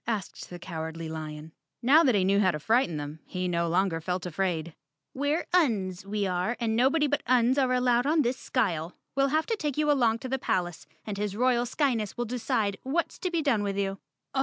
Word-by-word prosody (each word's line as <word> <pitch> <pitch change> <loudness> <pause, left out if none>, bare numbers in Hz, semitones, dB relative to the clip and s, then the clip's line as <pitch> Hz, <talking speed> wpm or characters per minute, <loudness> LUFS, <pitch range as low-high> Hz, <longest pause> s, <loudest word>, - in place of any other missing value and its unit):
asked 215 -5 -4
the 175 - -7
Cowardly 160 -1 -6
Lion. 155 0 -7 0.3
Now 295 +7 +6
that 255 -7 +3
he 195 - +3
knew 200 +1 +3
how 190 -2 +4
to 150 -4 -2
frighten 220 - +2
them, 145 +1 -6
he 180 0 -3
no 170 -1 0
longer 175 -1 +1
felt 180 +1 -3
afraid. 170 -2 -2 0.4
"We're 285 +4 0
Uns, 200 - +1
we 205 0 -1
are, 185 +5 -1
and 225 -2 0
nobody 270 +6 +3
but 290 0 0
Uns 250 +2 +3
are 260 -2 +2
allowed 250 0 +2
on 310 0 +3
this 250 +1 0
skyle. 175 -12 -1 0.2
We'll 275 0 +3
have 310 +3 +1
to 455 - -1
take 300 -9 -3
you 300 -1 +3
along 235 -5 +3
to 260 - -6
the 265 +1 -1
palace 175 - -2 0.2
and 205 -2 -4
his 205 -1 -2
royal 245 0 +2
Skyness 240 -6 -1
will 240 - -1
decide 220 -4 -1
what's 310 +6 -2
to 365 - -1
be 335 -3 -1
done 250 -8 +2
with 200 -1 -2
you." 195 -1 -1
220 Hz, 210 wpm, -28 LUFS, 180-260 Hz, 0.4 s, Now